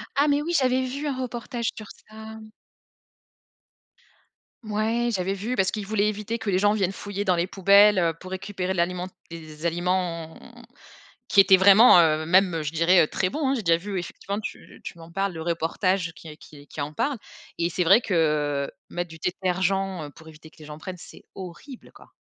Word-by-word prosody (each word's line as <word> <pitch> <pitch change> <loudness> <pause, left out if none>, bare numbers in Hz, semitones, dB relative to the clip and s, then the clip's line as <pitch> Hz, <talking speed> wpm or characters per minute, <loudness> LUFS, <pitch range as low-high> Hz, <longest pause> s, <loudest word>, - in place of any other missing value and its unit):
Ah 285 +2 +3
mais, 290 0 +2
oui, 340 +3 -3
j'avais 260 0 +1
vu 280 +4 -4
un 275 - -2
reportage 240 -1 -4
sur 215 -1 -9 0.2
ça. 215 - -15 2.5
Mouais, 220 +3 -1
j'avais 190 -1 -1
vu 220 +6 -4
parce 190 -1 +1
qu'ils 210 -3 -5
voulaient 210 -1 +1
éviter 215 +2 -3
que 210 -3 -3
les 185 - +2
gens 205 +1 +3
viennent 195 -3 0
fouiller 205 +1 -5
dans 185 -2 +3
les 170 +2 -1
poubelles, 200 +2 +5
heu, 165 -2 +2
pour 185 +3 -12
récupérer 190 -1 -4
de - - -6
l'aliment 180 +1 -1 0.2
des 155 -1 -9
aliments 170 -1 -2 0.9
qui 200 - +6
étaient 190 0 +7
vraiment, 195 0 +7
heu, 155 -1 +2
même, 185 0 +4
heu, 155 - -2
je 150 - -3
dirais, 170 +3 +4
heu, - - -2
très 185 +3 -2
bons, 295 0 -2
hein. - - +1
J'ai 230 - -3
déjà 165 -2 +3
vu 195 +1 -5
effectivement, 200 +4 -6
tu - - -9
tu 170 - -9
m'en 165 0 -13
parles, 195 0 -1
le 160 -1 -7
reportage 170 +1 -1
qui 155 -1 -11
qui 145 -1 -15
qui 150 - -8
en 145 +1 -4
parle. 275 - -2 0.4
Et 170 +1 0
c'est 180 +1 -1
vrai 195 +8 +6
que 150 - 0 0.2
mettre 175 0 -4
du 160 - -11
détergent 185 -2 -2
pour 160 -1 -15
éviter 160 0 -15
que - - -25
les 155 - -12
gens 150 0 -9
prennent, 180 +2 -7
c'est - - -14
horrible, 195 +8 -10
quoi. - - -18
185 Hz, 200 wpm, -24 LUFS, 165-210 Hz, 2.5 s, étaient